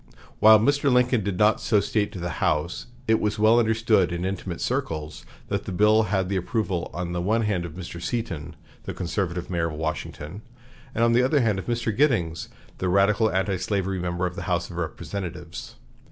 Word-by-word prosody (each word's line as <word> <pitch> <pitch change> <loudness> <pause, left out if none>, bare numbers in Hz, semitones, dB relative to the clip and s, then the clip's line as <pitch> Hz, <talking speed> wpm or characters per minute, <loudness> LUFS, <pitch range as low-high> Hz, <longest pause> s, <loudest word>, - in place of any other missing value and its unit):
While 110 0 +8
Mr. 140 +4 +2
Lincoln 125 -2 +3
did 95 -2 -2
not 105 +2 +3
so 105 - +3
state 105 0 0
to 95 - -6
the 85 -2 -4
House, 80 +7 0 0.2
it 110 0 +4
was 105 +1 -1
well 110 +3 +5
understood 110 -5 +2
in 85 +1 -2
intimate 95 -2 -4
circles 75 -1 -3 0.2
that - - -2
the - - -5
bill 105 +4 +4
had 95 -3 0
the 100 0 -1
approval 95 -2 -2
on 85 0 -4
the 90 0 -2
one 110 +5 +1
hand 95 -5 0
of 85 - -7
Mr. 85 -1 -7
Seaton, 85 -7 -4 0.3
the - - -5
conservative 90 0 -3
mayor 85 -2 0
of 80 - -5
Washington, 80 +3 -5 0.5
and 115 - +2
on 115 0 +4
the 120 - +5
other 135 +3 +3
hand 105 -5 +1
of - - -8
Mr. 120 -2 -1
Giddings, 100 - +1 0.3
the 95 - 0
radical 100 +4 +3
antislavery 95 0 -1
member 90 0 -2
of 90 0 -3
the 100 - -5
House 90 0 -1
of 85 - -8
Representatives. 90 +2 -6
95 Hz, 195 wpm, -25 LUFS, 85-110 Hz, 0.5 s, While